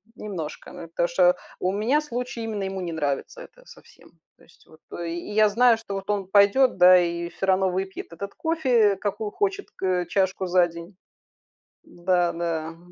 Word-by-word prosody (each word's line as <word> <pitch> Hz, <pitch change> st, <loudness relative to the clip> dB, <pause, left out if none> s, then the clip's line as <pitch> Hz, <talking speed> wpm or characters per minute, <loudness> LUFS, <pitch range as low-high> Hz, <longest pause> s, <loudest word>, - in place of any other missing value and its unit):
немножко, 180 Hz, -9 st, -7 dB
ну -, -, -9 dB
это 170 Hz, +1 st, -1 dB
что 180 Hz, +1 st, +3 dB, 0.2 s
у 185 Hz, -, 0 dB
меня 235 Hz, +9 st, +1 dB
случай, 245 Hz, -4 st, -5 dB
именно 215 Hz, -3 st, -3 dB
ему 190 Hz, 0 st, -4 dB
не 170 Hz, -2 st, -4 dB
нравится 150 Hz, -, -3 dB
это -, -, -15 dB
совсем. -, -, -18 dB, 0.3 s
То -, -, -23 dB
есть -, -, -24 dB
вот 160 Hz, 0 st, -19 dB, 0.2 s
и 170 Hz, -, -4 dB, 0.2 s
и -, -, -6 dB
я 215 Hz, 0 st, +4 dB
знаю, 235 Hz, +2 st, +4 dB
что 210 Hz, -3 st, -7 dB
вот 195 Hz, +1 st, -7 dB
он 200 Hz, -2 st, -1 dB
пойдёт, 205 Hz, +6 st, +4 dB
да, 180 Hz, 0 st, +8 dB
и 170 Hz, 0 st, -2 dB
всё 195 Hz, -, -4 dB
равно 190 Hz, 0 st, +3 dB
выпьет 190 Hz, -1 st, -5 dB
этот 200 Hz, +4 st, -7 dB
кофе, 250 Hz, -11 st, +2 dB
какую 205 Hz, +1 st, -3 dB
хочет 405 Hz, -, -2 dB
к 185 Hz, -2 st, -1 dB
чашку 190 Hz, +1 st, 0 dB
за 180 Hz, 0 st, +4 dB
день. 170 Hz, +3 st, -11 dB, 0.9 s
Н-да, 175 Hz, -1 st, 0 dB
да. 165 Hz, -2 st, -3 dB
Ага. 165 Hz, 0 st, -11 dB
190 Hz, 185 wpm, -24 LUFS, 175-215 Hz, 0.9 s, да